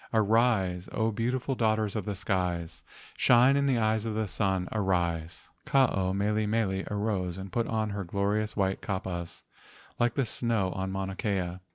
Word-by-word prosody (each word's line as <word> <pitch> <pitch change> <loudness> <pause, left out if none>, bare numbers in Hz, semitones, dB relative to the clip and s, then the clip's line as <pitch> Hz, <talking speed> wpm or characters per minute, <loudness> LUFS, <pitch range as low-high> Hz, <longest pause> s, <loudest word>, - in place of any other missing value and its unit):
Arise, 110 -5 +2
O 110 0 +1
beautiful 125 +4 -1
daughters 110 -3 +1
of 105 -4 -2
the 105 - -3
skies, 90 -5 -2 0.4
Shine 125 +3 +5
in 140 0 +2
the 130 -3 +2
eyes 110 -1 +1
of 110 -2 -3
the 110 -1 -1
sun, 95 -3 0
arise!" 85 -5 -1 0.2
Ke 150 - -5
ao 100 -9 +3
mele 105 +2 0
mele 100 -3 0
arose 100 -4 -1
and 95 0 -7
put 115 +3 0
on 110 -2 -1
her 100 0 -3
glorious 100 +4 -1
white 95 -1 0
kapas 95 -4 -4 0.6
like 120 -1 +2
the 135 - +1
snow 110 -4 0
on 95 +1 -3
Mauna 95 0 -3
Kea. 95 -3 -2
105 Hz, 170 wpm, -29 LUFS, 95-115 Hz, 0.6 s, Shine